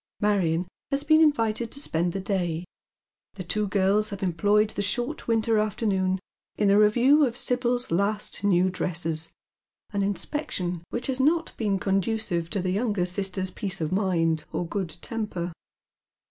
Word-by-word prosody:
Marion 180 -5 +1 0.2
has 275 +1 +1
been 310 +1 +5
invited 230 -7 +2
to 280 - -5
spend 175 - -1
the 195 - -3
day; 180 -4 -2 0.7
the 190 - -6
two 210 +4 -1
girls 200 +2 +2
have 200 -1 -6
employed 205 +4 +2
the 205 - -3
short 240 +8 -2
winter 225 -1 +2
afternoon 195 -3 0 0.4
ue 205 -2 +3
a 200 - +5
review 245 +8 +5
of 245 -3 0
Sibyl's 245 -1 0
last 200 +4 0
new 185 -2 +3
dresses, 165 -2 -1 0.6
an 200 -1 -1
inspection 195 - -2
which 240 - -3
has 265 -1 -1
not 320 +5 +2
been 205 -4 0
conducive 195 -3 -1
to 195 - -1
the 185 - 0
younger 205 -2 0
sister's 190 0 -2
peace 195 -3 -4
of 155 -2 -2
mind 170 -5 +1
or 175 - -2
good 190 -1 -3
temper. 210 -6 -3
200 Hz, 155 wpm, -26 LUFS, 180-225 Hz, 0.7 s, been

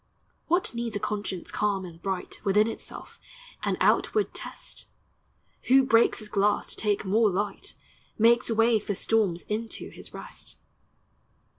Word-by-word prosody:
What 350 -3 +1
needs 235 -2 -3
a - - 0
conscience 205 -3 -4
calm 200 -2 0
and 165 -1 -11
bright 190 -2 -4
Within 205 +2 +4
itself, 225 - -8 0.4
an - - 0
outward 425 -1 +2
test? - - -7 0.8
Who 265 +1 +6
breaks 235 -3 +4
his 215 - -6
glass, 205 0 +1
to - - -2
take 210 -1 0
more 215 +3 +4
light, 200 +1 -3 0.4
Makes 230 +2 +4
way 225 0 +4
for 205 -1 -3
storms 195 -5 +1
into 220 +2 -4
his - - -10
rest. - - -10
210 Hz, 140 wpm, -27 LUFS, 200-230 Hz, 0.8 s, Who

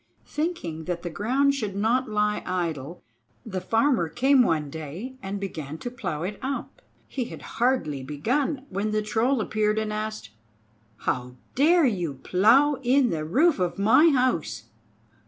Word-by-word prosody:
Thinking 235 - -3
that 175 -1 -3
the 175 - -4
ground 255 - +2
should 215 -8 -3
not 225 +5 +1
lie 210 0 +1
idle 170 -4 -3 0.4
the 185 -1 -4
Farmer 225 - +2
came 265 - +4
one 160 -10 +1
day 160 - -6
and 195 +1 -4
began 155 -6 -5
to 245 - -6
plow 180 -10 -4
it 200 +3 -4
up. 270 +1 -5 0.3
He 255 -3 -3
had - - -9 0.2
hardly 240 - +1
begun, 255 - -1
when 200 +3 -2
the 215 0 0
Troll 230 +5 +1
appeared 215 0 0
and 215 -1 -1
asked: 215 - -4 0.7
"How 125 0 -2 0.2
dare 320 +4 +4
you 175 - -1
plow 230 - +4
in 255 0 +3
the 155 -2 -2
roof 275 - +3
of 180 +1 -1
my 225 +11 +6
house?" 250 - 0
210 Hz, 155 wpm, -25 LUFS, 170-255 Hz, 0.7 s, my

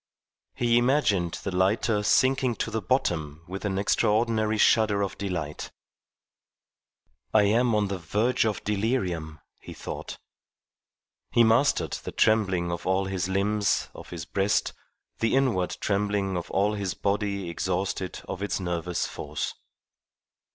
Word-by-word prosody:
He 120 -1 +3
imagined 120 - +2
the 95 -2 -3
lighter 105 +3 +2
sinking 130 +3 +3
to 115 - -3
the 110 0 -1
bottom 80 - -1
with 95 +3 -6
an 95 -2 -1
extraordinary 110 +2 +2
shudder 105 -2 +4
of 100 - -3
delight. 85 -7 -4 1.6
"I 105 - +7
am 115 +3 +3
on 105 -1 +2
the 95 -1 -4
verge 105 +9 +1
of 110 -2 -1
delirium," 95 - -1 0.2
he - - -10
thought. - - -7 1.1
He 120 - +4
mastered 115 +5 +3
the - - -6
trembling 95 -6 +2
of 85 +1 -5
all 95 +1 +2
his 95 -1 -2
limbs, 100 +2 +1
of - - -11
his 85 -4 -6
breast, 100 +3 0 0.5
the 115 +2 +2
inward 120 -10 +1
trembling 100 -1 0
of 85 - -4
all 100 +2 +1
his 100 -3 -3
body 100 -2 -1
exhausted 95 +1 -2
of 90 - -5
its 100 - -1
nervous 90 -1 -2
force. 75 0 -4
100 Hz, 135 wpm, -26 LUFS, 90-110 Hz, 1.6 s, I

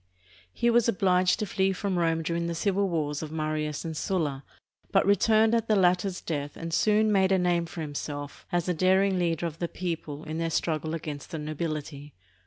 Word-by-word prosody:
He 235 - +1
was 235 0 +4
obliged 185 -3 +3
to 215 - -2
flee 190 0 +1
from 190 -1 -1
Rome 165 -1 +1
during 170 +1 -1
the 170 - -3
civil 195 +2 +1
wars 150 -3 -1
of 155 -2 -6
Marius 155 -1 -2
and 160 -1 -4
Sulla, 150 -5 -1 0.5
but - - +3
returned 220 +2 +4
at 230 -1 +1
the 215 - +3
latter's 180 0 +2
death 145 -3 -4
and 165 0 -5
soon 215 +3 +3
made 190 -2 +3
a 190 - +4
name 175 -2 +1
for 165 - -7
himself 145 -1 -6
as 175 0 0
a 180 - +2
daring 190 +2 +3
leader 170 -1 0
of 165 -1 -5
the 170 - -1
people 165 -4 -5
in 155 +1 -5
their 165 0 0
struggle 160 -1 -1
against 150 -3 -6
the 160 - -5
nobility. 150 -2 -5
170 Hz, 195 wpm, -27 LUFS, 155-190 Hz, 0.5 s, was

